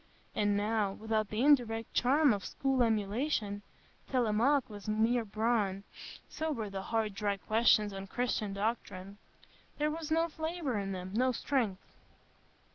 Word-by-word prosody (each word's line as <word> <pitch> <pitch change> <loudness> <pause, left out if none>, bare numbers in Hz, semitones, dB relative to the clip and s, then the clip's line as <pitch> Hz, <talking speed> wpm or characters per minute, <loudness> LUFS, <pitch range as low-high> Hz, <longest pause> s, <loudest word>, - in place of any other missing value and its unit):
And 205 -1 +1
now—without 215 0 0
the 215 +2 -2
indirect 235 -6 +3
charm 275 +1 +4
of 200 -2 -4
school 270 -2 0
emulation—Télémaque 225 +2 0
was 205 -3 -10
mere 225 +3 +2
bran; 210 -2 0 0.4
so 315 -1 -3
were 220 -7 -3
the 195 -1 -4
hard, 220 0 -1
dry 200 0 -1
questions 215 0 +3
on 195 0 -6
Christian 225 -2 -1
Doctrine; 200 -2 -3 0.6
there 300 +1 +1
was 320 0 -5
no 330 +1 +2
flavour 315 -6 -3
in 195 -1 -3
them, 185 0 -6
no 255 +4 +2
strength. 230 -6 -1
220 Hz, 130 wpm, -32 LUFS, 205-255 Hz, 0.6 s, charm